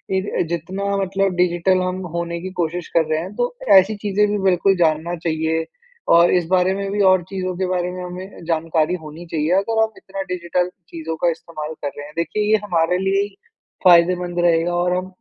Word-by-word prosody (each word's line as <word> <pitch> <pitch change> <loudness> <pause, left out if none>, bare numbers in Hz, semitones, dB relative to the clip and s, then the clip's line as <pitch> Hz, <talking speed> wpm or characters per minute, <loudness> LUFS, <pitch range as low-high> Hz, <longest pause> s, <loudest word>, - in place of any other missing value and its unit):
इर 190 +2 -1
अ, - - +4
जितना 190 +4 -2
मतलब 195 0 0
डिजिटल 180 +1 +2
हम 185 0 -2 0.2
होने 170 0 -3
की 185 - -5
कोशिश 170 +1 -3
कर 160 - +4
रहे 155 - +2
हैं 190 +4 -8
तो 245 0 -1 0.3
ऐसी 195 +3 0
चीज़ें 205 +1 +2
भी 210 - 0
बिल्कुल 190 +1 +3
जानना 165 0 +1
चाहिए 160 0 0 0.5
और 170 +1 +5
इस 180 -2 +2
बारे 185 0 +3
में 195 0 -3
भी 205 0 0
और 185 -2 +3
चीज़ों 185 -2 -3
के 190 - 0
बारे 180 -1 -1
में 180 0 -6
हमें 180 +1 -8
जानकारी 165 0 0
होनी 155 +3 -9
चाहिए 155 +1 0
अगर 220 +3 +1
हम 220 - -1
इतना 195 0 -7
डिजिटल 180 0 -1 0.2
चीज़ों 160 -1 -5
का 175 - +5
इस्तेमाल 160 -1 -7
कर 145 - -2
रहे 145 - -6
हैं। 150 - -14
देखिए, 170 +5 -1
ये 220 - +6
हमारे 180 -2 +1
लिए 195 +1 +1
ही 205 -1 -8 0.5
फ़ायदेमंद 175 0 +4
रहेगा 170 +1 +2
और 180 +1 +1
हम 185 - -3
180 Hz, 205 wpm, -20 LUFS, 170-190 Hz, 0.5 s, ये